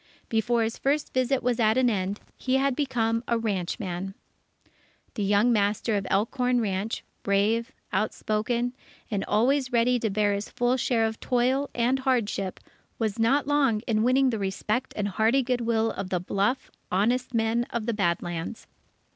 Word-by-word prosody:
Before 230 +1 +1
his 225 +1 -3
first 290 +2 0
visit 255 +1 +1
was 245 -1 0
at 220 +1 +3
an 260 -1 +4
end, 200 -2 -1 0.2
he 260 0 -1
had 270 -1 +2
become 235 -5 0
a 235 - +2
ranchman. 195 -3 -3 1.0
The 215 - -4
young 205 +4 +3
master 210 +1 +1
of 195 -2 -2
Elkhorn 245 +5 +1
Ranch, 205 0 -2 0.2
brave, 215 +5 +1 0.2
outspoken, 220 +4 -1 0.4
and 200 -2 0
always 255 +4 +2
ready 245 +1 +3
to 225 - 0
bear 205 0 +1
his 200 +1 -3
full 245 +1 +1
share 235 -3 +1
of 220 0 -3
toil, 260 +3 +1
and 250 +2 +2
hardship, 230 -8 -1 0.4
was 220 -2 -2
not 265 +6 +3
long 275 -7 +2
in 215 -2 0
winning 255 +3 +3
the 225 - -2
respect 210 +6 -2
and 205 -1 0
hearty 220 +7 +2
good 250 0 0
will 225 -1 +1
of 195 -1 -5
the 180 - 0
bluff, 200 +8 -1 0.2
honest 240 +6 +1
men 225 +1 +1
of 235 -2 -3
the 235 - 0
Bad 175 -5 0
Lands. 175 +5 -5
230 Hz, 165 wpm, -26 LUFS, 205-250 Hz, 1.0 s, an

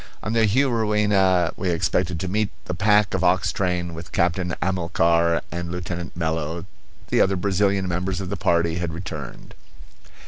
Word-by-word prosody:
On 110 - -2
the 115 -1 +3
Juruena 105 -7 +2
we 95 - -2
expected 85 0 0
to 95 - -3
meet 105 +2 0 0.2
the 90 - -3
pack 105 +1 +3
ox 90 +1 +2
train 90 -4 -1
with 85 +1 -9
Captain 85 0 0
Amilcar 85 -2 +1
and 85 -1 -4
Lieutenant 90 -2 -5
Mello; 80 0 -2 0.4
the - - +3
other 95 0 +3
Brazilian 95 0 +1
members 90 +2 -2
of 95 -2 -5
the 100 - -2
party 85 -2 +1
had 85 -2 -3
returned. 75 -6 -8
90 Hz, 150 wpm, -23 LUFS, 85-100 Hz, 0.4 s, the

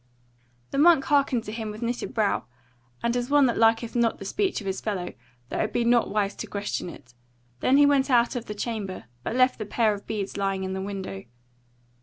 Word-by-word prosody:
The 275 - -1
monk 320 -2 +6
hearkened 275 -5 +2
to 210 - -6
him 220 -1 -4
with 215 +3 -6
knitted 240 +1 -2
brow, 220 -5 0 0.6
and 235 +1 +1
as 245 +1 -1
one 290 -1 +5
that 240 - +1
liketh 225 +1 +3
not 235 -1 +2
the 195 - -9
speech 385 - 0
of 210 - -9
his 190 0 -3
fellow, 185 -5 -3 0.4
though - - -3
it 215 - 0
be 240 - +1
not 240 0 +3
wise 205 -1 0
to - - -5
question 200 -3 -3
it: 125 -7 -13 0.5
then 260 - +4
he 290 - +7
went 280 -1 +3
out 240 -2 +3
of 240 -1 -3
the 210 - -5
chamber, 205 -3 -4 0.2
but 170 - -3
left 255 -1 +3
the 215 - -3
pair 220 0 +2
of 205 - -9
beads 205 -3 -3
lying 195 -1 -1
in 190 0 -3
the 190 - -3
window. 190 - -5
225 Hz, 220 wpm, -26 LUFS, 200-245 Hz, 0.6 s, he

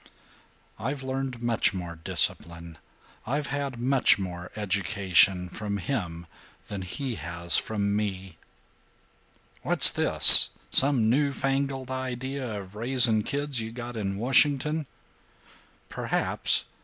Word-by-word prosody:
"I've 135 +5 -5
learned 130 -2 -5
much 115 -4 0
more 85 -2 -7
discipline, 85 0 -2 0.5
I've 145 +4 -2
had 140 -3 -4
much 130 +2 +2
more 90 -2 -7
education, 95 -2 +1
from 100 +2 -6
him 85 -7 -5 0.4
than 100 -2 -6
he 125 +8 -6
has 85 +1 -1
from 100 -2 -3
me." 95 -5 -5 1.2
"What's - - +5
this? - - +7 0.2
Some 135 -5 +4
new 140 +5 +1
fangled 135 -1 -3
idea 130 -2 -5
of 95 0 -15
raising 115 -1 +4
kids 140 +1 -2
you 110 0 -7
got 120 0 -8
in 100 -3 -4
Washington?" 140 +5 +1 1.0
"Perhaps. - - -1
115 Hz, 110 wpm, -25 LUFS, 95-135 Hz, 1.2 s, this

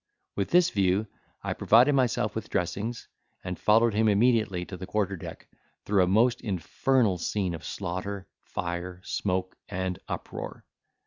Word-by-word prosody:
With 100 - -1
this 175 0 +5
view 95 +1 +2 0.4
I - - -1
provided 125 +6 +5
myself 120 -5 +1
with 110 -1 -5
dressings, 100 +5 -2 0.4
and 90 -1 -4
followed 115 +1 +4
him 110 +1 +3
immediately 105 -4 +3
to 95 - -7
the 95 +1 -7
quarter 100 -2 0
deck, 85 - -9 0.4
through 100 -2 +3
a - - +2
most 115 +6 +3
infernal 105 - +1
scene 95 0 -1
of 80 -2 -7
slaughter, 95 +3 -4 0.2
fire, 90 +1 -4
smoke, 95 -2 -2
and 95 -2 -2
uproar. - - -6
100 Hz, 145 wpm, -28 LUFS, 90-110 Hz, 0.4 s, this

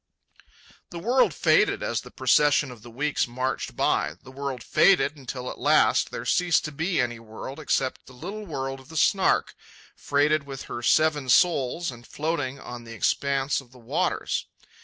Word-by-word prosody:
The 175 - -8
world 240 +9 +3
faded - - +2
as - - -1
the - - -12
procession 145 -2 +3
of 120 -3 -12
the 120 - -12
weeks 140 +5 -1
marched 130 +2 -3
by. - - +1
The 130 - -12
world 135 -2 -5
faded 190 -5 +4
until 130 -2 -7
at - - -10
last - - +3
there - - -6
ceased 175 -2 +2
to 150 - -4
be 165 +5 -1
any 120 -2 -1
world 115 +5 -9
except 135 -3 -1
the 130 - -13
little 195 +10 -7
world 135 -3 -4
of 135 +2 -17
the 160 - -7
Snark, 190 +4 +2 0.4
freighted 145 +1 +1
with 135 -1 -7
her 120 - -6
seven 150 0 +2
souls 165 0 +3
and 120 -1 -13
floating 145 -4 -3
on 120 -2 -8
the 115 0 -9
expanse 140 +5 0
of 125 -3 -20
the 130 - -16
waters. 115 -2 -2
140 Hz, 175 wpm, -25 LUFS, 125-160 Hz, 0.4 s, faded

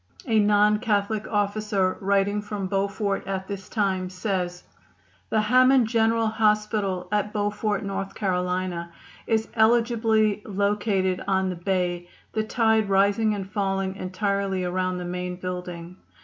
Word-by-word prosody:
A 220 -2 +3
non 210 0 +4
Catholic 215 -1 0
officer 205 -2 0
writing 200 +1 +1
from 205 -2 -4
Beaufort 200 +1 -1
at 190 -1 -3
this 200 -2 -7
time 190 -4 0
says: 180 -2 -3 0.7
"The 215 - +2
Hammond 255 +3 +5
General 225 0 +2
Hospital, 210 -4 +1
at 210 0 0
Beaufort, 205 0 -1
N. 195 0 -3
C., 180 -2 -1 0.5
is 220 -1 +1
eligibly 220 -2 +3
located 200 -2 0
on 190 -1 +1
the - - -4
bay, 175 -1 -2 0.2
the 220 - 0
tide 220 -2 +2
rising 200 +2 +3
and 195 -2 -5
falling 195 -2 -1
entirely 195 0 -1
around 185 0 -1
the 180 - -5
main 180 0 -4
building. 180 -1 -6
200 Hz, 130 wpm, -25 LUFS, 185-215 Hz, 0.7 s, Hammond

